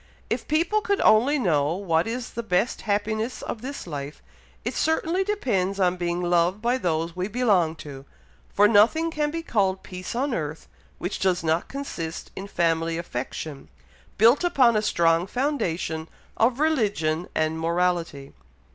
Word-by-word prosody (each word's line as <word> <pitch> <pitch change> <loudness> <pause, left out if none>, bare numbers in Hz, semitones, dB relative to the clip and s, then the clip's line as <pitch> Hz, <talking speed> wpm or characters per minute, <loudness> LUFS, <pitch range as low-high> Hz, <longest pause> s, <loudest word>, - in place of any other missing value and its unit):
If - - -2
people 335 +8 +1
could 405 -2 0
only 250 +8 +5
know 160 - +1
what 170 -3 0
is 240 +1 -4
the 235 - -4
best 220 +1 0
happiness 220 +4 -1
of 220 - -5
this 275 +3 -6
life, 145 -3 -7 0.4
it - - -1
certainly 330 +3 +1
depends 205 - -1
on 180 -1 +3
being 175 0 -2
loved 175 +2 +2
by 240 +3 0
those 165 -3 -1
we 185 +1 -2
belong 205 -8 +2
to; 135 -2 -9 0.5
for 205 +1 +5
nothing 230 +11 +4
can 300 -2 0
be 330 +2 -4
called 195 -9 0
peace 185 +3 -7
on 265 +2 0
earth, 155 -4 -4 0.3
which 180 - -4
does 185 -3 +1
not 160 +1 0
consist 170 -13 -6
in 195 - -6
family 165 -3 0
affection, 145 -1 -6 0.5
built 235 - +5
upon 260 -9 +4
a 215 - +3
strong 170 -4 +2
foundation 175 - -2 0.3
of 240 +3 +2
religion 205 - +1
and 155 0 0
morality." 170 -4 -1
190 Hz, 155 wpm, -25 LUFS, 165-245 Hz, 0.5 s, only